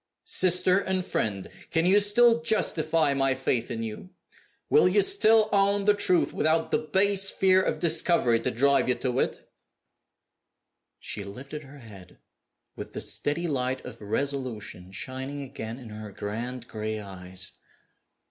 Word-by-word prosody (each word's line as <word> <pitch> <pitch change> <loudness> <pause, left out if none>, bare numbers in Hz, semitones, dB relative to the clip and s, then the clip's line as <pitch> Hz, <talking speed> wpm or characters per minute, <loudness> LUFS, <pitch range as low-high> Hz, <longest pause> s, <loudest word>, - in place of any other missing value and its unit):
Sister 180 +1 +3
and 190 -2 -2
friend! 100 -4 -2 0.2
can 165 0 +1
you 195 +3 +5
still 230 +3 +4
justify 165 -9 +1
my 135 -1 +1
faith 120 -1 -1
in 115 -2 -4
you? 110 +11 -7 0.6
Will 450 - +5
you 410 - +4
still 225 - +4
own 200 0 +2
the 210 - +5
truth, 185 -4 +1
without 160 +1 +1
the - - +2
base 195 +3 +2
fear 190 -1 +3
of - - -2
discovery 160 -8 +2
to - - -1
drive 140 +2 +2
you 125 - +3
to 130 -1 -2
it?" - - -2 1.5
She 100 - -5
lifted 130 +9 -8
her 140 +2 -14
head, 100 -8 -14 0.6
with - - -9
the - - -5
steady 170 +4 -1
light 130 -3 -2
of 115 -3 -10
resolution 110 -6 -4
shining 130 +7 -6
again 115 -3 -7
in 125 -4 -11
her 105 -1 -8
grand, 120 +5 -5
gray 110 0 -4
eyes. 95 -2 -6
140 Hz, 150 wpm, -26 LUFS, 115-185 Hz, 1.5 s, you